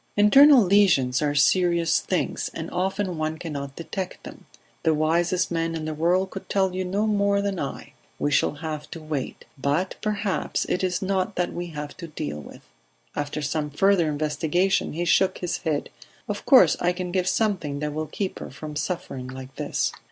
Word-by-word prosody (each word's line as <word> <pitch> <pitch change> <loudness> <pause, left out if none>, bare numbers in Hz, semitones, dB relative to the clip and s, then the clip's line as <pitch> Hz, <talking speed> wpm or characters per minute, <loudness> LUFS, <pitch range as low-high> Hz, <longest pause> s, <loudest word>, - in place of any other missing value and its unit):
"Internal 270 +5 +8
lesions 175 -10 +3
are 145 -1 0
serious 170 +2 +3
things, 185 - -2
and 165 0 -5
often 185 -1 -1
one 155 0 -2
cannot 140 -4 -6
detect 185 +2 -5
them. - - -11 0.3
The 160 -2 +2
wisest 170 +4 +1
man 165 -1 -1
in 160 -1 -4
the 155 - -3
world 180 +5 +1
could 195 - -8
tell 190 -2 +1
you 185 0 -2
no 195 +4 0
more 200 -1 +2
than 200 -2 -2
I. 140 - -5 0.2
We 145 - 0
shall 140 - +2
have 155 -1 -5
to 165 - -7
wait... 155 -4 -5
But 145 +8 0
perhaps 210 -2 -1
it 180 - -1
is 185 +1 0
not 190 +1 -1
that 180 - -1
we 175 0 -4
have 150 -3 -7
to 170 - -7
deal 75 - -5
with." 75 - -12 0.5
After 145 +1 -3
some 150 0 -1
further 175 +2 +3
investigation 155 +5 0
he 170 +3 -2
shook 190 +2 +3
his 175 -1 -3
head. 155 -4 -2 0.4
"Of - - -5
course - - +7
I 175 +1 +1
can 180 0 -4
give 185 0 0
something 185 -10 0
that 150 0 -3
will 155 +1 -3
keep 190 +5 -4
her - - -7
from 150 +3 -8
suffering 150 -5 -4
like 130 +1 -9
this." - - -1
170 Hz, 185 wpm, -25 LUFS, 150-190 Hz, 0.5 s, Internal